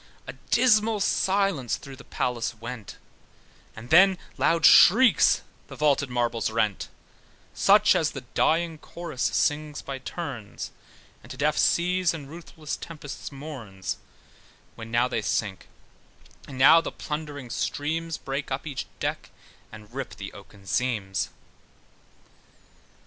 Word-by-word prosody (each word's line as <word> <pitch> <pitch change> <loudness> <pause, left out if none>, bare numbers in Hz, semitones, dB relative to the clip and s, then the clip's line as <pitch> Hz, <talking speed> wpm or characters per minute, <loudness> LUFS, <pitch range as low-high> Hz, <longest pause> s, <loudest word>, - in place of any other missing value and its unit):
A - - -7 0.2
dismal 220 -3 +4
silence 195 - +1
through 135 -1 -11
the 135 - -13
palace 120 -1 -2
went, 115 -2 -8 0.8
And 115 +3 -11
then 190 +3 +7 0.2
loud 165 -2 +2
shrieks 220 - +7 0.2
the - - -10
vaulted 140 -2 +2
marbles 120 -2 0
rent, 110 -2 -1 0.6
Such - - +5
as - - +2
the - - -7
dying 165 -1 +1
chorus 170 -5 -8
sings 150 0 0
by 135 -1 -6
turns, 130 - -6 0.5
And - - -16
to - - -8
deaf - - +1
seas, 180 0 +2
and 145 -4 -8
ruthless 160 -1 -7
tempests 150 -4 -8
mourns, 130 - -6 0.8
When 115 0 -9
now 120 +2 +2
they 115 - -2
sink, 105 -2 -2 0.8
and 135 - -9
now 145 +5 +7
the - - -5
plundering 150 -5 -6
streams 160 +5 -2
Break 135 +1 -4
up 135 +2 -3
each 140 -5 -5
deck, - - -3 0.4
and 105 +1 -13
rip 135 -1 -5
the 100 - -8
oaken 100 0 -15
seams. 100 -4 -1
140 Hz, 125 wpm, -26 LUFS, 120-165 Hz, 0.8 s, then